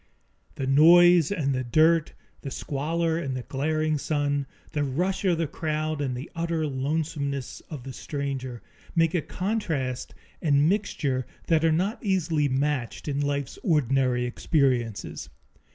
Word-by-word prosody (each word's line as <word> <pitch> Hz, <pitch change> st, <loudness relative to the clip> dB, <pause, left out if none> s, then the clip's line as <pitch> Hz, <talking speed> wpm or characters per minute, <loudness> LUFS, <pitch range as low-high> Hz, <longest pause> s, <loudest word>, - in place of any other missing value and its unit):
The 135 Hz, -, -3 dB
noise 170 Hz, +4 st, +6 dB
and 145 Hz, -8 st, 0 dB
the 130 Hz, 0 st, -1 dB
dirt; 155 Hz, +6 st, +3 dB, 0.3 s
the 140 Hz, -, -5 dB
squalor 160 Hz, +5 st, -1 dB
and 135 Hz, -5 st, -3 dB
the 125 Hz, -, -5 dB
glaring 155 Hz, +3 st, 0 dB
sun; 145 Hz, -2 st, 0 dB, 0.2 s
the 150 Hz, -2 st, 0 dB
rush 175 Hz, +9 st, -1 dB
of 175 Hz, -3 st, +3 dB
the 165 Hz, -, 0 dB
crowd 155 Hz, 0 st, -2 dB
and 130 Hz, -3 st, -2 dB
the 130 Hz, -, -7 dB
utter 165 Hz, -1 st, -1 dB
lonesomeness 140 Hz, -1 st, -2 dB
of 145 Hz, -6 st, -7 dB
the 135 Hz, 0 st, -7 dB
stranger, 135 Hz, -5 st, -4 dB, 0.3 s
make 165 Hz, -1 st, +3 dB
a 175 Hz, -, +1 dB
contrast 160 Hz, -, -2 dB, 0.3 s
and 145 Hz, -2 st, +3 dB
mixture 150 Hz, -, 0 dB, 0.2 s
that 160 Hz, -1 st, +2 dB
are 165 Hz, -, +4 dB
not 190 Hz, +10 st, 0 dB
easily 165 Hz, -7 st, +1 dB
matched 135 Hz, -1 st, -1 dB
in 140 Hz, -1 st, -1 dB
life's 140 Hz, -2 st, -2 dB
ordinary 130 Hz, -5 st, +2 dB
experiences. 120 Hz, -5 st, 0 dB
150 Hz, 140 wpm, -26 LUFS, 135-165 Hz, 0.3 s, noise